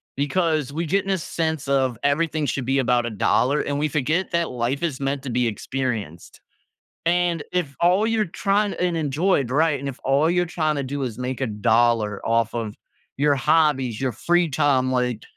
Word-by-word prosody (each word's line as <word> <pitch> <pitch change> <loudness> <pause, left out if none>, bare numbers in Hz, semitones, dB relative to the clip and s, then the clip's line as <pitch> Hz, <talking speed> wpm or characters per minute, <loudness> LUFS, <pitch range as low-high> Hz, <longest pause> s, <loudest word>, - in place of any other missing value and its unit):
because 150 -1 0
we 165 +3 -3
get 195 +5 +1
in 195 - -1
a 190 - +2
sense 160 -3 -3
of 130 -3 +1
everything 155 +1 +1
should 135 -2 -2
be 135 +1 +1
about 120 -2 +2
a - - -2
dollar, 130 +6 +1
and 145 0 -2
we 150 0 0
forget 155 +7 -1
that 170 -1 0
life 125 +4 -2
is 140 -6 -2
meant 135 0 -2
to 130 - -5
be 125 +1 +1
experienced. 115 - -4 0.7
And 175 -2 +1
if 165 -6 -1
all 185 +5 +3
you're 225 -2 +1
trying 200 +3 0
and 175 -2 -1
enjoyed, 150 -2 +1
right, 150 0 +2
and 140 - -4
if 130 - -7
all 140 +4 +3
you're 175 0 +1
trying 155 -3 -1
to 140 - -1
do 140 +1 -4
is 120 -2 -4
make 125 +1 -4
a 130 - 0
dollar 110 0 +1
off 115 0 +1
of 115 -3 -4 0.4
your 145 +1 +3
hobbies, 135 -5 +2
your 130 - 0
free 175 - +1
time 135 -2 +2
like, 125 -3 -1
140 Hz, 195 wpm, -23 LUFS, 125-165 Hz, 0.7 s, all